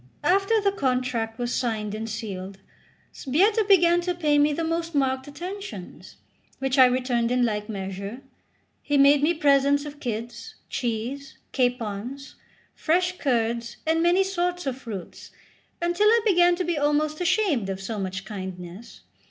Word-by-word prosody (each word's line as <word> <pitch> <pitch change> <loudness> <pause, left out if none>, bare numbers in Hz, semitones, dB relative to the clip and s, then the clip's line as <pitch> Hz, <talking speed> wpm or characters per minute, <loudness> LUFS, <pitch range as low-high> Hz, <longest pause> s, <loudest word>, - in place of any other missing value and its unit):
After 390 +7 +3
the 400 -1 +2
contract 250 - -1
was 240 0 -2
signed 215 -4 -2
and 220 +1 -4
sealed, 195 -3 -6 0.6
Sbietta 400 - +2
began 350 -3 +5
to 355 0 -2
pay 300 -4 +2
me 295 +1 +4
the 330 +3 -2
most 330 0 -2
marked 265 -1 0
attentions, 345 - -8 0.4
which 270 0 0
I 260 - +10
returned 250 -2 0
in 250 0 +2
like 210 -1 -2
measure. 200 +4 -6 0.6
He 290 -1 0
made 280 +1 +6
me 330 +4 +2
presents 285 -1 +3
of 290 0 -9
kids, 235 -2 -5 0.2
cheese, 245 +4 -4
capons, 245 +1 -2 0.4
fresh 360 +3 0
curds, 235 -3 -1
and 325 +1 +2
many 350 +3 +4
sorts 355 -2 -2
of 265 -2 -1
fruits, 210 -8 -8 0.5
until 345 +5 +2
I 460 +2 +5
began 355 -4 +4
to 365 - -2
be 345 -3 -1
almost 300 +2 0
ashamed 355 - +1
of 190 0 -3
so 210 +2 -5
much 190 0 -4
kindness. 185 +1 -8
275 Hz, 150 wpm, -25 LUFS, 225-345 Hz, 0.6 s, I